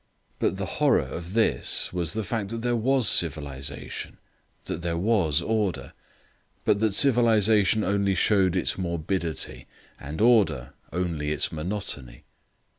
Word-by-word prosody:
But - - 0
the - - -3 0.2
horror - - +4
of 85 +2 -7
this 110 -4 +1
was 85 -3 0
the 110 0 -2
fact 105 -1 -3
that 115 +1 -5
there 120 0 +1
was 125 0 +2
civilization, 70 -5 -1 0.5
that 85 - -5
there 85 -1 -2
was 85 -6 +1
order, 105 -4 -2 0.7
but 100 - +2
that 110 -2 +1
civilisation 110 -5 +4
only 100 0 +1
showed 95 -1 +2
its 90 - 0
morbidity, 85 -1 -3 0.3
and 75 +3 -7
order 105 - +3 0.2
only 85 -4 -2
its 75 - -1
monotony. 75 -8 -5
95 Hz, 130 wpm, -25 LUFS, 80-110 Hz, 0.7 s, horror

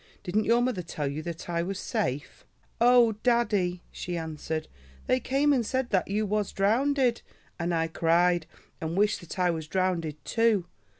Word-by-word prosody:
Didn't 210 +4 0
your 235 +1 +3
mother 245 -7 -1
tell 160 -3 -4
you 140 +3 -3
that 170 0 -6
I 170 -1 -1
was 190 +3 -3
safe?" 135 -3 -3 0.4
"Oh! 240 -1 +6
daddie," 205 -8 +1
she 175 -1 -4
answered, 160 -1 -4 0.4
"they 255 - +2
came 275 +3 +2
and 250 -4 +2
said 260 +2 -2
that 190 -3 +2
you 210 +2 0
was 210 0 -1
drownded, 245 +4 +2 0.4
and 170 +1 -1
I 165 -1 +1
cried 170 +1 +2 0.3
and 165 +2 -3
wished 210 +1 +2
that 175 - -9
I 180 -1 +3
was 160 -2 -5
drownded 170 -4 -1
too. 225 -5 +2
185 Hz, 170 wpm, -28 LUFS, 165-230 Hz, 0.4 s, Oh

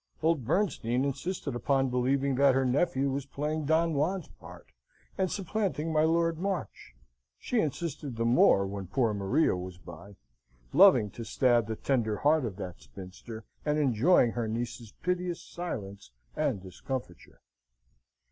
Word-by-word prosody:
Old 160 -6 +2
Bernstein 135 - 0
insisted 140 +2 -3
upon 135 +2 +1
believing 135 +2 +1
that 135 0 +4
her 135 0 +2
nephew 135 +1 +1
was 140 0 -3
playing 150 +2 -3
Don 160 +2 +2
Juan's 165 +6 -1
part, - - -12 0.5
and 190 -1 0
supplanting 185 -5 -2
my 155 - +3
Lord 165 0 +2
March. 180 - -4 0.4
She 245 - -1
insisted 150 - -3
the 115 0 -1
more 115 -4 +5
when 100 -1 -5
poor 115 +2 +1
Maria 100 +7 +1
was 90 0 -7
by; 85 +3 -12 0.6
loving 135 - +6
to 115 - -7
stab 120 0 +2
the 110 - -3
tender 110 -4 0
heart 150 +1 +3
of 105 -5 -4
that 90 -3 -7
spinster, 100 +4 -10 0.2
and 150 0 0
enjoying 130 -1 +4
her 120 -1 -2
niece's 115 0 -4
piteous 180 -1 -2
silence 100 - -6 0.3
and 95 - -1
discomfiture. 95 0 -7
135 Hz, 145 wpm, -29 LUFS, 110-160 Hz, 0.6 s, loving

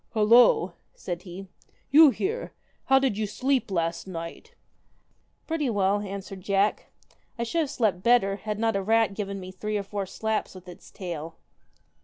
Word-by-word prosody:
1 215 -2 +2
Halloo 240 +1 +7
1 175 0 -7
' - - -43
said 175 -1 -5
he, 185 +1 -9 0.5
'you 305 +1 +9
here! 415 - -3 0.3
How 270 - +5
did 265 -6 +1
you 215 - 0
sleep 260 +3 0
last 170 -1 -2
night? 180 - -8 0.3
' - - -41
' - - -43
Pretty 320 -5 -1
well,' 200 -2 +1
answered 195 -1 -7
Jack. 200 +2 +1 0.3
' - - -39
I 235 - -1
should 285 +8 -1
have 300 - -2
slept 215 -10 0
better, 200 -3 +3
had 210 0 -4
not 225 -1 0
a 195 - 0
rat 225 +1 +2
given 200 -1 -4
me 185 0 -8
three 210 +3 -3
or 200 - -3
four 200 0 -4
slaps 220 +1 -3
with 185 0 -12
its 180 - -12
tail.' 165 -4 -6
205 Hz, 195 wpm, -26 LUFS, 190-235 Hz, 0.5 s, you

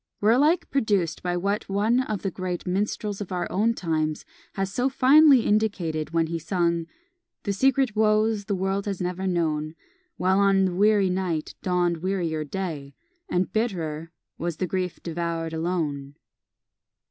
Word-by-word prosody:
were 210 +2 +4
alike 295 +8 +3
produced 205 - 0
by 175 -1 -1
what 200 +4 -2
one 210 +5 +2
of 215 -6 -4
the 195 - -1
great 180 -1 -4
minstrels 205 +2 -2
of 195 - -6
our 180 -1 -1
own 220 +4 +2
times 155 -4 -2 0.3
has 195 -1 -3
so 250 +2 +1
finely 275 +1 +6
indicated 190 -9 0
when 165 0 +1
he 165 +1 -3
sung 170 -1 0 0.6
The 200 - -1
secret 265 +1 +2
woes 215 -1 +2
the 200 - -1
world 195 +2 -1
has 195 -3 -3
never 180 +1 -2
known; 155 -3 -1 0.4
While 190 +1 +2
on 195 -1 +4
the 185 - -1
weary 200 0 +3
night 180 -4 -2
dawn'd 175 -2 +1
wearier 170 -3 -2
day, 150 -4 -5 0.3
And 180 +1 0
bitterer 165 -8 -2 0.3
was 170 -2 -3
the 185 - -1
grief 180 -1 -3
devour'd 165 -1 -3
alone. 155 -5 -2
185 Hz, 155 wpm, -25 LUFS, 165-205 Hz, 0.6 s, finely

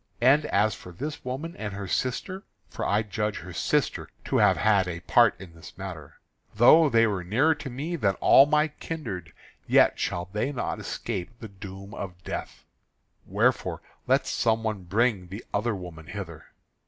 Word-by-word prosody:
And 140 +5 +4
as 110 -5 +2
for 90 - -11
this 145 - -6
woman 140 +7 -5
and 105 -2 -5
her 100 -1 -5
sister 130 - -2 0.3
for - - -5
I 105 +2 +2
judge 105 -1 -2
her - - -9
sister - - 0 0.2
to - - 0
have - - +4
had 100 -4 +3
a 85 -1 -5
part 120 +3 +4
in 90 -4 -11
this 80 0 -13
matter 90 -7 -8 0.4
though 150 +8 +7
they 115 -2 +4
were 100 -5 -1
nearer 130 - +3
to 145 -2 -7
me 145 +8 -4
than 100 - +1
all 135 - +6
my 150 +1 +3
kindred, 115 - -6 0.4
yet - - +4
shall 90 0 -2
they 105 +7 -1
not 130 - -3
escape 115 0 -5
the 110 - -8
doom 100 +1 -10
of 90 -4 -7
death. - - -6 0.6
Wherefore - - 0 0.2
let - - +3
some 115 -1 +1
one 105 -4 -3
bring 105 -1 +1
the 100 +5 -8
other 105 +2 0
woman 85 -4 -9
hither." 85 -4 -7
105 Hz, 175 wpm, -26 LUFS, 95-130 Hz, 0.6 s, though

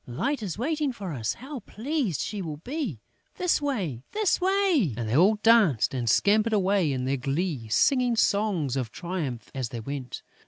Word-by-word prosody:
Light 250 - -2
is 195 -5 -4
waiting 295 +3 0
for 195 -8 -6
us!... 115 -5 -2
How 270 +2 -7
pleased 230 - -2
she 210 -2 -3
will 155 -4 -5
be!... 240 - -4 0.3
This 360 -4 +1
way, 195 - -2
this 420 -3 +1
way!..." 370 - +2
And 115 -2 -3
they 110 - 0
all 190 +8 +5
danced 215 - +4
and 120 -3 -1
scampered 215 - +3
away 195 -5 +2
in 130 -1 -2
their 135 +1 0
glee, 140 -1 -2
singing 245 - +3
songs 200 - +1
of 130 -4 -2
triumph 170 -10 -5
as 130 -4 -3
they 120 - -6
went. 130 +2 -6
190 Hz, 180 wpm, -26 LUFS, -, 0.3 s, all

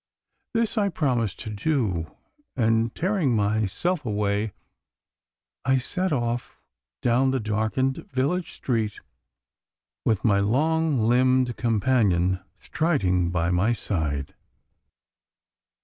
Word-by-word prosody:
This 230 0 +1
I 200 -1 +2
promised 125 - -1
to 110 - -5
do, 105 - -1 0.5
and 115 -1 +1
tearing 175 - +1
myself 110 - 0
away 105 -1 -1 1.1
I 130 +1 +3
set 180 +9 -2
off 120 -3 -2 0.4
down 125 +2 +3
the 130 0 0
darkened 110 +5 -1
village 145 +7 0
street, 110 -4 -2 1.0
with 110 -1 0
my 100 -3 +4
long 155 +8 +2
limbed 125 +2 +3
companion 105 -6 +2 0.2
striding 90 - 0
by 85 -1 0
my 100 +7 +2
side. 75 -10 -2
115 Hz, 100 wpm, -25 LUFS, 105-135 Hz, 1.1 s, my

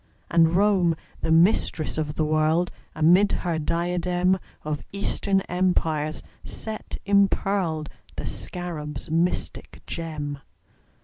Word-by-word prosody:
And 165 0 +5
Rome, 190 -4 +4 0.3
the - - 0
Mistress 165 -2 +3
of 150 -1 -2
the 155 - +1
World, 155 +3 +2 0.2
Amid 175 +6 +5
her 170 -3 0
diadem 175 +3 +1 0.2
Of 150 -1 -3
Eastern 200 0 0
Empires 165 -5 0 0.2
set 220 -1 -5
impearled 195 -5 +2 0.3
The - - -4
Scarab's 155 -4 -4
mystic 170 +2 -1
gem. 150 -4 -4
170 Hz, 105 wpm, -25 LUFS, 155-185 Hz, 0.3 s, And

